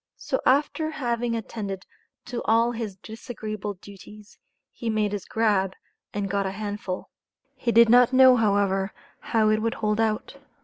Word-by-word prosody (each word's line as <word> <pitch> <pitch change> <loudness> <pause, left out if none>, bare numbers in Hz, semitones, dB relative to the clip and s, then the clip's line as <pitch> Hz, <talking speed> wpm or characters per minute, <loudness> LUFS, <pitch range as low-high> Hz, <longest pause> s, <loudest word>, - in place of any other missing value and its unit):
So - - -2
after 295 +4 +2
having 240 -5 -2
attended 205 -4 -5 0.4
to 245 -1 -4
all 230 +2 +3
his 225 -4 -5
disagreeable 215 -1 -6
duties, 200 +3 -14 0.3
he 230 - -5
made 215 -2 0
his 205 -2 -4
"grab," 205 -4 +1 0.4
and 205 -1 -2
got 200 0 -1
a - - -1
hand 205 +1 -5
full. 185 -1 -5 0.4
He 245 -2 -1
did 235 0 +7
not 245 +2 +6
know, 260 -1 +7
however, 200 -3 +1 0.3
how 220 -2 +1
it 215 0 +1
would 230 +1 -1
hold 210 0 -1
out. 220 +4 -1
215 Hz, 160 wpm, -25 LUFS, 205-235 Hz, 0.4 s, did